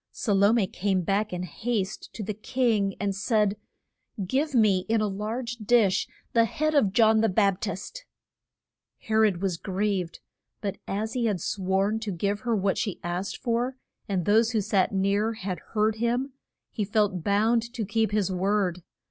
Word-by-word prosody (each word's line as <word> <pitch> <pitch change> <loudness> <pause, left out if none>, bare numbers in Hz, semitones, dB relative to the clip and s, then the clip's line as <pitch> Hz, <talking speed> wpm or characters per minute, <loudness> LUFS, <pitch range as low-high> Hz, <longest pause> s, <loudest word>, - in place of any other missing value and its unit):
Sa 210 - -1
lo 200 +2 +5
me 230 -4 +3
came 190 0 -1
back 200 +4 0
in 180 0 -3
haste 200 +3 -3
to 220 - -5
the 210 +2 -3
king, 215 -3 0
and 200 -1 -1
said, 210 0 +1 0.7
Give 275 - 0
me, 210 -5 +4
in 225 0 +3
a 215 - +1
large 225 +5 -4
dish, 215 -3 +3 0.3
the 230 -1 +5
head 310 +7 -1
of 245 -10 +3
John 220 +1 +4
the 225 - +3
Bap 195 0 +2
tist. 200 - -5 1.0
He 220 - -6
rod 210 -4 +3
was 185 -4 0
grieved, 190 -2 -2 0.4
but 200 -2 -4
as 215 +3 -2
he 245 -2 0
had 200 -4 0
sworn 195 +4 0
to 220 -2 -4
give 200 +3 -1
her 235 +1 0
what 195 -1 0
she 200 -5 -2
asked 175 +3 -3
for, 240 +2 0 0.3
and 185 -4 0
those 225 +3 +3
who 220 - +2
sat 190 -1 +1
near 200 +3 +1
had 190 -6 -4 0.2
heard 215 +1 +2
him, 245 +4 -1 0.4
he 215 - -2
felt 205 -3 0
bound 225 +4 +2
to 235 -4 -3
keep 220 +2 +1
his 205 -3 +1
word. 185 -1 0
210 Hz, 175 wpm, -26 LUFS, 195-225 Hz, 1.0 s, lo